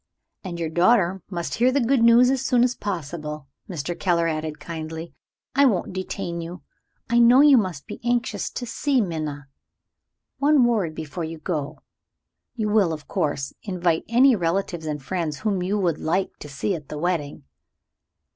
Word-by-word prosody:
"And 175 -3 -6
your 165 -2 -2
daughter 185 +1 +3
must 170 -3 -4
hear 250 +2 +3
the 280 - +2
good 255 0 +2
news 235 +2 +6
as 265 -1 0
soon 250 -2 +3
as 250 0 +2
possible," 155 - -5 0.2
Mr. 175 -1 -3
Keller 170 -1 +1
added 155 -1 -3
kindly. 160 0 -6 0.4
"I 280 +2 +5
won't 200 -8 +1
detain 185 -2 -4
you. 170 +2 -8 0.4
I 235 +1 +3
know 240 +3 +7
you 290 -2 +7
must 185 - 0
be - - -8
anxious 240 0 -1
to 245 - -5
see 275 +3 0
Minna. 155 - -3 0.9
One 285 -3 +4
word 205 -10 0
before 160 +2 -5
you 160 +1 -5
go. 155 -3 -4 0.7
You 215 -3 -1
will, 205 -6 +3
of 155 -1 -8
course, 140 -2 -2
invite 175 -4 0
any 250 +2 +5
relatives 175 -2 -1
and 150 -2 -4
friends 160 -2 -3
whom 200 -4 0
you 190 +4 0
would 175 -6 0
like 185 +4 -1
to 150 - -9
see 140 +8 -2
at 150 -5 -7
the 150 - -5
wedding." 160 -3 -2
180 Hz, 170 wpm, -24 LUFS, 160-230 Hz, 0.9 s, know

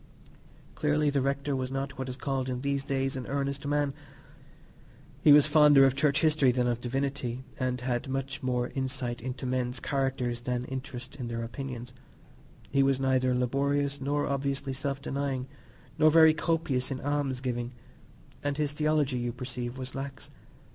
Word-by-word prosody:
Clearly 150 0 +1
the 140 -1 +1
rector 140 +1 0
was 130 -1 -2
not 135 0 -4
what 130 -1 -3
is 125 - -4
called 135 -2 -2
in 125 -1 -3
these 140 0 -1
days 135 -1 -1
an 130 -2 -5
"earnest" 140 0 -2
man: 145 -1 +1 1.3
he 150 - +7
was 145 0 +8
fonder 150 -3 +7
of 135 - +4
church 145 +1 +2
history 155 -5 +4
than 125 0 +1
of 120 -1 0
divinity, 130 -1 -2 0.2
and 130 -1 0
had 125 0 -2
much 135 0 -3
more 125 -1 -1
insight 130 -3 -3
into 130 +2 -5
men's 125 0 -1
characters 130 -4 -1
than 125 0 -2
interest 130 0 -6
in 125 -3 -4
their 115 0 -3
opinions; 125 0 -6 0.8
he 140 - +3
was 135 -1 +3
neither 130 -1 +2
laborious, 140 +3 0
nor 145 +2 0
obviously 140 0 -1
self 135 +1 -3
denying, 135 -2 -2 0.5
nor 155 0 +7
very 160 0 +7
copious 155 -5 0
in 135 -2 -3
alms 145 -2 -1
giving, 120 -2 -3 0.7
and 145 0 -1
his 150 -2 0
theology, 150 -4 +1
you 120 0 -1
perceive, 125 0 -5
was 130 -1 -6
lax. 135 0 -6
135 Hz, 165 wpm, -29 LUFS, 125-140 Hz, 1.3 s, was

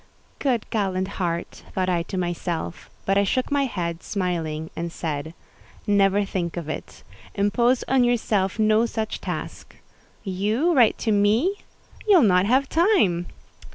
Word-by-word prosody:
"Good, 250 -6 0
gallant 190 -3 0
heart!" 170 -1 -3
thought 185 -1 0
I 175 -2 +1
to 190 +3 -5
myself; 175 -1 -3 0.2
but 195 +1 +3
I - - +3
shook 255 +8 -1
my 285 -1 +2
head, 170 -8 -3
smiling, 165 -5 -3
and 170 0 -4
said, 160 -1 -4 0.5
"Never 200 0 +3
think 175 -3 -3
of 170 -3 -4
it: 155 - -7 0.3
impose 235 +5 +2
on 260 -1 +3
yourself 215 -6 +1
no 215 +1 +3
such 220 -1 -4
task. - - -6 0.5
You 210 - 0
write 245 -7 +4
to 220 - +2
me!—you'll 290 - +1
not 185 -2 +4
have 265 +4 +3
time." 320 - +2
200 Hz, 140 wpm, -24 LUFS, 175-235 Hz, 0.5 s, write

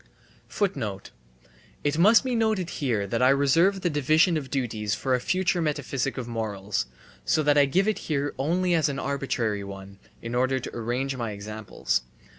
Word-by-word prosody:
It 145 0 +1
must 215 +8 +6
be 260 -1 -2
noted 220 -6 0
here 115 -8 0
that 115 +4 -2
I 130 - +6
reserve 165 +8 +3
the 175 - +1
division 155 +4 +3
of 140 -4 -3
duties 110 -6 -1
for 130 - -1
a 125 - +3
future 180 +4 0
metaphysic 140 -4 -2
of 125 -2 -4
morals; 105 - -3 0.4
so 155 - +2
that 145 0 +4
I 145 -1 +6
give 185 +9 +1
it 215 - 0
here 145 -1 0
only 175 +6 +1
as 160 -3 +3
an 140 - -3
arbitrary 130 -7 -1
one 100 0 -9 0.2
(in 115 +1 -6
order 130 +2 +2
to - - -8
arrange 125 +4 -2
my 120 -3 -3
examples). 105 +1 -3
135 Hz, 170 wpm, -26 LUFS, 115-160 Hz, 0.4 s, must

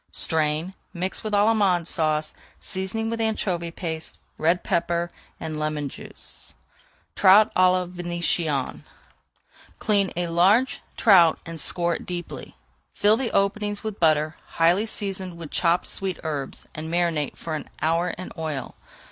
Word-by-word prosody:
Strain, 160 +2 +1 0.2
mix 185 +2 -2
with 215 -1 -1
Allemande 200 -5 +3
Sauce, 155 -2 0 0.3
seasoning 195 +4 -2
with 230 0 -2
anchovy 185 -6 -1
paste, 160 -2 -5 0.2
red 170 +3 +2
pepper, 170 -1 0 0.3
and 155 -1 -4
lemon 150 -2 -2
juice. - - -8 0.6
TROUT 205 +3 +6
À 185 0 +5
LA 185 0 +1
VÉNITIENNE 175 -5 -1 1.0
Clean 200 -3 +2
a 175 +1 0
large 190 +10 +3 0.2
trout 180 -7 +6
and 165 -1 -5
score 170 +3 +2
it - - -12
deeply. 175 -1 -6 0.4
Fill 210 +1 +5
the 245 0 -1
openings 205 +1 0
with 215 -2 -5
butter 155 -1 +3 0.2
highly 175 +6 +4
seasoned 190 -4 -2
with 165 -3 -8
chopped 170 0 +2
sweet 190 -3 -4
herbs, 145 -4 -4
and 155 +1 -6
marinate 170 -4 0
for 165 - -5
an 155 - -5
hour 165 +3 +2
in 185 +1 -6
oil. 155 -5 -4
175 Hz, 140 wpm, -24 LUFS, 160-195 Hz, 1.0 s, TROUT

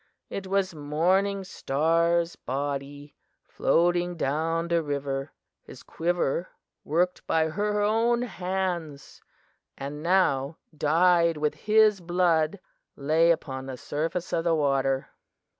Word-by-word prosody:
It 195 -1 -5
was 195 -1 0
Morning 180 +7 0
Star's 170 +1 +1
body, 140 +2 -5 0.3
floating 175 +1 +1
down 165 +4 -1
the 170 -1 +2
river; 140 -2 -3 0.3
his - - -13
quiver, 170 -1 -1 0.3
worked 175 +4 -1
by 160 -1 +2
her 210 +5 -1
own 230 +3 +2
hands 180 - -4 0.6
and 145 +2 -6
now 165 -5 +1 0.2
dyed 170 +2 +3
with 150 0 0
his 210 +5 +3
blood, 175 0 +1 0.4
lay 155 +4 +2
upon 135 -5 -1
the 130 -1 -6
surface 165 +7 -3
of 165 - +1
the 165 -1 +2
water. 135 -2 +1
165 Hz, 110 wpm, -26 LUFS, 145-180 Hz, 0.6 s, dyed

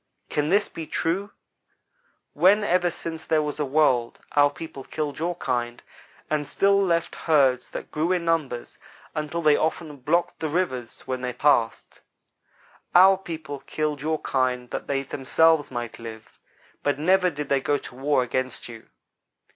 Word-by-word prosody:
Can 150 0 0
this 205 +1 +3
be 160 -2 -7
true, 190 +5 -1 1.0
when 205 +4 +4
ever 180 -2 +2
since 165 -1 -6
there 155 -1 +1
was 150 0 -4
a 150 - +1
world, 130 -4 +2
our 145 0 +5
people 145 -3 -9
killed 150 0 -4
your 175 +2 -1
kind, 120 -6 -2 0.5
and 150 -2 -1
still 200 0 +3
left 170 -3 0
herds 135 -6 +2
that - - -7
grew 160 +4 0
in 180 -2 0
numbers 155 -7 -1 0.3
until 155 +2 -3
they 150 -1 +6
often 155 -1 -2
blocked 155 +7 0
the 160 - -2
rivers 130 -9 -2
when 130 -1 -3
they 125 -1 -3
passed? 120 -6 +1 0.9
Our 190 +2 +8
people 160 -6 -7
killed 150 -1 -3
your 155 +1 -1
kind 125 -2 -1
that - - -4
they 135 -1 0
themselves 145 +4 +2
might 120 -1 -5
live, 110 -1 -10 0.4
but 145 -1 0
never 180 +4 +3
did 150 -2 -6
they 140 -1 +2
go 145 +2 +1
to - - -10
war 135 +1 +1
against 130 0 -3
you. 115 -2 -12
150 Hz, 160 wpm, -25 LUFS, 130-165 Hz, 1.0 s, Our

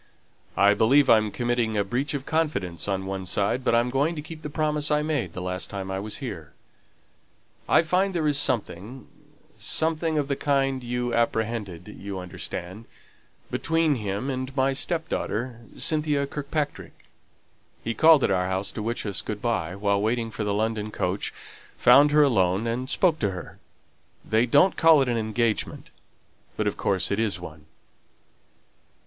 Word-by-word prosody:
"I 100 +1 +6
believe 130 +6 +4
I'm 110 -2 +4
committing 120 -1 -1
a 100 - +2
breach 130 +8 -2
of 140 -1 -5
confidence 100 - -1
on 95 -1 -1
one 95 -1 -4
side; 100 +7 0
but 115 - +2
I'm 120 +1 +2
going 145 +6 +1
to 150 - -4
keep 160 0 -9
the 150 - -6
promise 150 0 -1
I 150 0 +2
made 145 - -2
the 90 - -5
last 90 0 -3
time 95 -1 -5
I 95 - -2
was 105 +2 -4
here. - - -7 1.2
I - - +5
find 185 +3 +1
there 160 -3 +1
is 145 -1 +3
something 120 -1 -2 0.5
something 160 0 0
of 145 -2 0
the 140 - 0
kind 135 -2 0
you 120 0 -2
apprehended 110 -6 -1
you 100 -1 -6
understand 90 +3 -6 0.7
between 165 -2 +1
him 105 +2 -3
and 130 +1 -4
my 135 +1 +2
step 160 +4 -2
daughter, 120 -3 -3 0.2
Cynthia 150 -2 +1
Kirkpatrick. 145 +1 -5 0.8
He 115 - -2
called 155 +4 +6
at - - +2
our 90 -1 +1
house 95 +1 -2
to 110 - -6
wish 115 +2 -3
us 100 -2 -2
good 105 -1 -5
by, 95 -7 -1
while 100 0 +1
waiting 115 +1 -1
for 110 0 -4
the 105 - -1
London 110 0 -1
coach, 95 -2 -2 0.5
found 140 +4 +6
her 150 0 +5
alone, 95 -6 +2
and 125 +3 -2
spoke 170 -1 +2
to 105 - +1
her. 90 -2 -8 0.7
They 110 +3 +2
don't 185 +10 +4
call 160 -4 +6
it 130 - -3
an 120 - 0
engagement, 110 0 -1 0.7
but - - 0
of - - 0
course 95 -2 0
it 100 - 0
is 105 -4 0
one." 80 -3 -11
120 Hz, 170 wpm, -25 LUFS, 100-145 Hz, 1.2 s, I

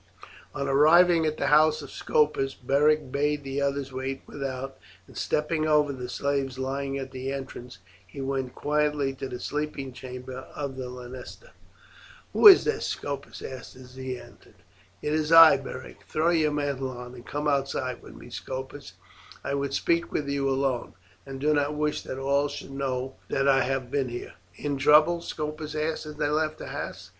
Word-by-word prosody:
On 140 - -2
arriving 160 +4 +5
at 155 - -2
the - - -1
house 155 0 +5
of 140 - -10
Scopus 145 -3 +1
Beric 145 +2 +2
bade 145 +1 0
the 135 +1 -3
others 140 -1 -1
wait 130 +1 -4
without, 135 -1 -5 0.3
and - - -17
stepping 155 +1 0
over 150 -2 +3
the 125 -2 -6
slaves 140 -2 -1
lying 135 +1 -2
at 135 -1 -5
the 130 +1 -4
entrance, 130 -5 -7 0.3
he 120 - -10
went 135 -2 -2
quietly 150 -2 0
to 135 0 -6
the 125 - -6
sleeping 145 -2 -3
chamber 125 0 -8
of 140 -2 -4
the 130 -1 -5
lanista. 125 - -10 0.8
"Who - - +8
is 390 - +10
this?" 450 - -1
Scopus 140 -1 -5
asked 130 -1 -8
as 125 0 -13
he 130 -1 -5
entered. - - -17 0.5
"It 150 - 0
is 155 0 0
I, 165 -1 +10
Beric; - - -8
throw 160 +2 +2
your 155 -3 +3
mantle 140 -3 -1
on 125 -1 -8
and 120 -1 -11
come 145 +3 -3
outside 135 -3 -1
with - - -13
me, - - -12
Scopus. 130 +2 -6 0.5
I 140 - -2
would 140 -1 -1
speak 170 +3 +1
with 145 - -2
you 140 -1 0
alone, 135 -2 -1 0.3
and 135 0 -6
do 150 +2 +2
not 145 0 +1
wish 150 0 0
that 130 - -5
all 140 +2 +1
should 145 -1 -8
know 135 -1 -3
that 135 0 +1
I 135 -1 +5
have 130 -1 -2
been 135 -3 0
here." 120 0 -6 0.2
"In 145 +4 -2
trouble?" 155 +4 +5
Scopus 155 -1 -5
asked 155 0 -2
as 150 - -7
they - - 0
left 155 +1 0
the - - -8
house. - - -6
140 Hz, 180 wpm, -27 LUFS, 130-150 Hz, 0.8 s, is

